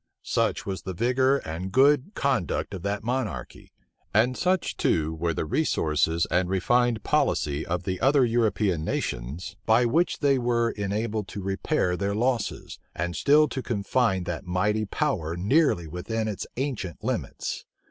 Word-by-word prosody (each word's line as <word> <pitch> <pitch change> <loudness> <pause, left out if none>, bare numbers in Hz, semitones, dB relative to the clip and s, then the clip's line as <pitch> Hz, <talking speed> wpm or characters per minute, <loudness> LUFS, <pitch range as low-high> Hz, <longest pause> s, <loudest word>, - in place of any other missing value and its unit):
Such - - 0
was 95 -2 -4
the 95 - -6
vigor 130 +5 +2
and 85 +4 -5
good 140 - +3
conduct 115 - -1
of 95 - -5
that 100 +2 -2
monarchy! 125 -3 -4 0.4
and 120 +4 +4
such, 185 +3 0
too, 80 0 +1
were 85 +1 -1
the - - -2
resources 80 - +1
and 90 +1 +2
refined 115 +4 +2
policy 75 0 +1
of 90 +1 -2
the 95 -1 -3
other 135 0 +4
European 110 -7 +1
nations, 75 +10 -4
by 115 +2 +5
which 165 +9 +2
they 140 -2 +2
were 120 -1 +1
enabled 105 +1 -2
to 100 - -7
repair 95 - 0
their 100 +2 -1
losses, 120 -1 -1 0.2
and 85 +1 -2
still 150 +2 +5
to 135 - -3
confine 105 -3 0
that 85 0 -4
mighty 105 +4 +1
power 95 - -1
nearly 105 - +2
within 110 +7 -3
its 105 -3 -4
ancient 125 - -3
limits! - - -3
105 Hz, 150 wpm, -26 LUFS, 90-125 Hz, 0.4 s, by